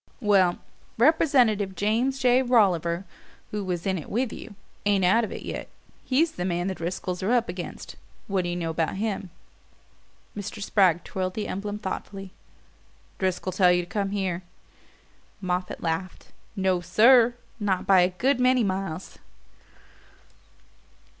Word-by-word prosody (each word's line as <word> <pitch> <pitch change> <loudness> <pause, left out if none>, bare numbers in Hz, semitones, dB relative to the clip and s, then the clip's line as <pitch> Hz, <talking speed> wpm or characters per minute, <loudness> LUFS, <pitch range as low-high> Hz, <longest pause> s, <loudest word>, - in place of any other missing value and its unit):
"Well, 195 -6 +3 0.4
Representative 240 -8 +3
James 230 +7 0
J. 250 -1 +4
Rolliver, 190 -8 +2 0.5
who 210 -1 -3
was 180 -2 -3
in 190 -2 0
it 155 - -10
with 240 +2 -1
you, 220 - -10 0.3
ain't 200 -2 +2
out 225 +6 +4
of 220 - -4
it - - -7
yet. - - -6 0.3
He's 310 +5 +2
the 180 - -5
man 175 -1 -1
the 190 - -1
Driscolls 180 +1 -4
are 195 +5 0
up 240 -2 +2
against. 175 0 -7 0.3
What 195 -2 0
d'you 175 -1 -3
know 165 -2 -2
about 160 +2 -1
him?" 200 -2 -3 1.1
Mr. 210 +1 -6
Spragg 190 -4 +2
twirled 185 -1 -3
the 215 - -3
emblem 205 +2 -4
thoughtfully. 195 -1 -6 0.9
"Driscoll 185 0 -1
tell 180 0 +4
you 175 0 +2
to - - -12
come 200 +1 -2
here?" 190 -3 -2 1.0
Moffatt 180 -1 -3
laughed. 165 +2 -3 0.3
"No, 190 -2 +1
SIR 235 +5 +5 0.2
not 195 -3 0
by 190 -2 +6
a 180 - +3
good 250 +9 0
many 255 -1 +4
miles." 190 -3 -4
195 Hz, 145 wpm, -26 LUFS, 180-220 Hz, 1.1 s, by